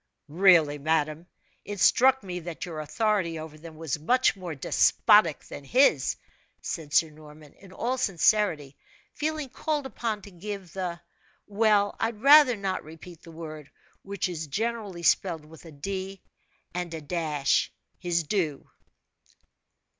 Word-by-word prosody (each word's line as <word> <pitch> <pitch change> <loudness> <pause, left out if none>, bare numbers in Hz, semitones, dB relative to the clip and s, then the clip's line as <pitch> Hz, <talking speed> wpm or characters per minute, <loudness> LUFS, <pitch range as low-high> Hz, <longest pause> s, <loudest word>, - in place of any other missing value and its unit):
"Really, 160 -3 +4
madam, 155 +2 -1 0.4
it 205 -1 -7
struck 265 +3 +4
me 180 -2 -5
that 170 -1 -6
your 165 -3 -7
authority 185 0 -1
over 155 -1 -8
them 160 +1 -12
was 160 -2 -4
much 250 +12 +2
more 180 -5 -7
despotic 170 +5 +3
than 145 - -10
his," 165 - +3 0.4
said 155 -3 -6
Sir 160 +1 +3
Norman, 150 -1 -15
in 195 -2 -17
all 250 +7 -2
sincerity, 170 - +1 0.4
feeling 305 -1 -3
called 295 +2 -2
upon 225 -5 -4
to 200 - -12
give 190 0 -8
the 180 -3 -4 0.5
well, 205 -1 +2
I'd 225 -1 -2
rather 280 0 +7
not 195 -2 -3
repeat 160 +2 -13
the 165 - -13
word, 155 -3 -9 0.3
which 200 -1 -3
is 160 -3 -5
generally 205 +1 -3
spelled 165 -2 +1
with 160 +2 -15
a 165 - -11
d 190 +5 -6 0.5
and 175 -1 -4
a 160 - -6
dash 150 -3 0 0.3
his 170 -2 0
due. 155 -4 -2
175 Hz, 140 wpm, -27 LUFS, 155-210 Hz, 0.5 s, rather